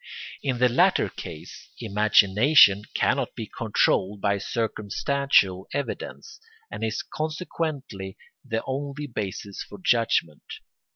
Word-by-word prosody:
In 130 -3 -1
the 125 +1 +4
latter 120 - +3
case 75 - -10
imagination 105 +1 +5
cannot - - 0
be - - -5
controlled 100 +2 0
by 100 0 +1
circumstantial 110 -1 0
evidence, 340 - -5 0.3
and - - -6
is 110 0 -2
consequently 155 - -4 0.3
the 110 0 -3
only 140 +2 -4
basis 100 -5 -5
for 105 - -9
judgment. 95 -7 +1
110 Hz, 105 wpm, -25 LUFS, 100-140 Hz, 0.3 s, imagination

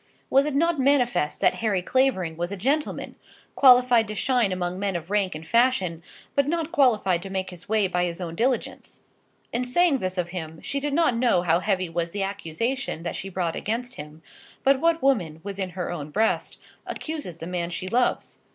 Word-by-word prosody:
Was 275 +2 +4
it 295 - -2
not 335 +1 +2
manifest 255 - +2
that - - +4
Harry 200 -5 +1
Clavering 190 -10 +1
was 175 +3 -3
a 200 - -4
gentleman, 280 +10 -1 0.4
qualified 250 -3 +6
to 215 - -5
shine 245 -2 +1
among 180 0 -2
men 195 -2 -1
of 170 +2 -5
rank 200 -4 +1
and 155 +1 -8
fashion, 215 -7 +2 0.3
but 280 -1 +2
not 330 0 -1
qualified 220 - +3
to 195 - -7
make 190 -1 -3
his 180 +1 -11
way 215 -2 +3
by 180 -1 0
his 170 0 -4
own 170 -3 -5
diligence? 245 +7 -2 0.5
In 240 - 0
saying 280 +3 +2
this 185 -2 -3
of 175 -1 -1
him, 160 -3 -6
she 280 - -2
did 285 0 -2
not 325 -7 +3
know 230 -7 +2
how 170 -1 +3
heavy 185 -2 0
was 170 0 -2
the 200 +3 -3
accusation 200 +2 -3
that 170 - -3
she 195 - -5
brought 175 -3 -2
against 245 +4 -3
him; 150 +2 -10 0.4
but 270 0 +4
what 330 -2 +2
woman, 180 - +1
within 195 -1 -4
her 180 - -2
own 155 -4 -5
breast, 220 +8 0 0.3
accuses 300 - -5
the 165 - -7
man 175 -1 -3
she 175 +1 -5
loves? 245 +5 0
200 Hz, 195 wpm, -25 LUFS, 175-255 Hz, 0.5 s, qualified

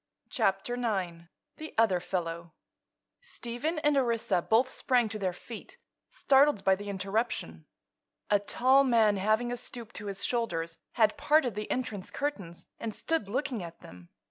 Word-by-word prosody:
CHAPTER 195 +5 0
IX 190 -9 -2 0.3
THE 310 0 -8
OTHER 215 -5 +4
FELLOW 170 -2 -4 0.7
Stephen 305 - -4
and 295 -1 +2
Orissa 235 -8 +1
both 225 +7 +3
sprang 250 -2 +1
to 215 0 -4
their 190 -2 0
feet, 230 - -10 0.3
startled 275 -6 +3
by 190 - +5
the 205 +2 -4
interruption. 195 - -2 0.6
A 205 - +5
tall 260 +6 +4
man, 225 -5 +4
having 215 +5 +1
a 245 - -2
stoop 235 -2 -7
to 210 - -6
his 195 -1 -3
shoulders, 170 -9 -2
had 220 +3 +3
parted 290 -4 +3
the 210 +1 -5
entrance 215 -7 -3
curtains 200 - -4
and 225 -2 -4
stood 325 -12 -1
looking 255 -1 -2
at 170 -1 -9
them. 90 -1 -13
220 Hz, 150 wpm, -30 LUFS, 190-250 Hz, 0.7 s, by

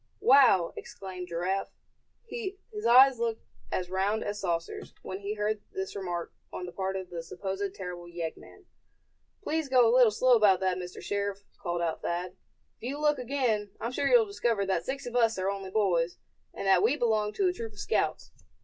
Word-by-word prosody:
"Wow!" 245 -11 +5
exclaimed 185 -2 -8
Giraffe, 180 +3 -1 0.6
his 420 -1 -5
eyes 260 +1 +7
looking 230 -1 -2 0.3
as 180 - -1
round 195 +3 0
as 205 0 -3
saucers, 170 -3 -3
when 190 - -5
he 200 +1 -4
heard 210 0 -1
this 385 -1 -4
remark 175 -4 -4 0.2
on 180 - -5
the 175 - -7
part 190 +1 -3
of 190 -1 -5
the 170 -1 -4
supposed 195 +3 -4
terrible 180 -2 -7
yeggman. 175 - -7 0.8
"Please 315 -4 -1
go 250 -3 +6
a 230 - +3
little 250 -3 +7
slow 255 +4 +3
about 205 -5 +5
that, 185 -1 +1
Mr. 180 0 -8
Sheriff!" 200 0 -2 0.2
called 175 -2 -2
out 165 -2 -2
Thad. 175 +1 -3 0.4
"If - - -43
you 280 - -3
look 300 -1 +2
again, 240 -5 0
I'm 230 - -3
sure 275 - 0
you'll 480 -3 +6
discover 235 - 0
that 190 -3 -1
six 275 0 -4
of 245 0 -6
us 230 -3 +3
are 190 +1 0
only 195 -1 -5
boys, 180 -5 +1 0.3
and - - -6
that 190 -2 +5
we 280 +5 +3
belong 215 -5 +1
to 390 - +1
a 360 - +1
troop 225 -9 -6
of 205 - -14
scouts. 440 - -1
205 Hz, 190 wpm, -29 LUFS, 185-250 Hz, 0.8 s, eyes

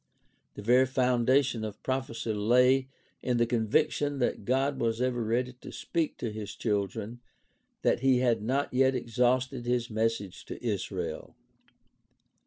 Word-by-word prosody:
The 105 - -8
very 125 +4 +4
foundation 125 -1 +2
of 105 -1 -7
prophecy 120 -4 -2
lay 125 +5 +3 0.3
in 125 -2 0
the 120 - +3
conviction 140 +5 +1
that 120 -5 -1
God 135 +3 +1
was 115 -1 0
ever 125 -2 0
ready 120 +3 -1
to - - -9
speak 165 -3 -2
to 115 - -3
his 105 -2 -6
children, 105 +2 -2 0.6
that - - +3
he 130 0 +4
had 120 -3 +2
not 130 +6 -1
yet 130 +1 +3
exhausted 125 +1 0
his 120 -1 0
message 110 -3 -2
to - - -7
Israel. 105 -5 -3
120 Hz, 140 wpm, -29 LUFS, 115-130 Hz, 0.6 s, very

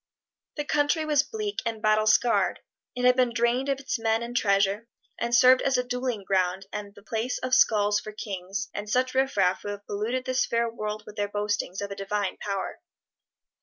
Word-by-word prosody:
The 295 - -2
country 295 +2 +1
was 300 -2 +3
bleak 420 +5 -4
and 230 -2 -3
battle 215 0 +2
scarred; 235 +2 +3 0.3
it 250 0 -1
had 250 0 +6
been 250 -2 +2
drained 240 +3 +1
of 275 -1 0
its 270 -3 -3
men 225 0 +1
and 240 +1 -6
treasure, 200 0 +2 0.3
and 235 +1 +1
served 255 +1 +7
as 270 -1 +2
a 250 - +1
dueling 245 -3 -3
ground 190 0 0
and 205 -1 -6
the 205 - -15
place 230 +3 -2
of 255 0 -4
skulls 210 -3 +4
for 215 - -8
kings 200 +3 -5
and 205 0 -5
such 255 +3 +1
riffraff 205 -9 +2
who - - -8
have 205 0 -6
polluted 230 +5 -2
this 255 0 +1
fair 235 0 +1
world 215 -2 -5
with 210 - -12
their 205 0 -1
boastings 205 -2 -2
of 200 0 -4
a - - -4
divine 200 0 -2
power. 200 - -4
225 Hz, 200 wpm, -26 LUFS, 205-255 Hz, 0.3 s, served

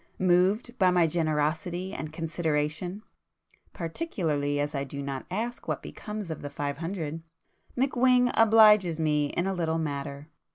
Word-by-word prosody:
Moved 190 +7 +2
by 185 -2 +5
my 180 -2 +4
generosity 165 +4 -1
and 155 -1 -5
consideration, 160 +3 -2 0.7
(particularly 160 - -2
as 145 +1 -1
I 140 -1 -1
do 140 +1 -7
not 135 -1 -5
ask 230 +6 -4
what - - -2
becomes 210 -5 -6
of 160 - -6
the 145 - -5
five 145 0 -4
hundred) 165 -2 -4 0.6
McWhing 250 -1 +3
'obliges' 215 -6 +6
me 150 -2 +2
in 175 - -2
a 195 - 0
little 165 -3 -1
matter. 140 -1 -4
165 Hz, 140 wpm, -28 LUFS, 150-195 Hz, 0.7 s, obliges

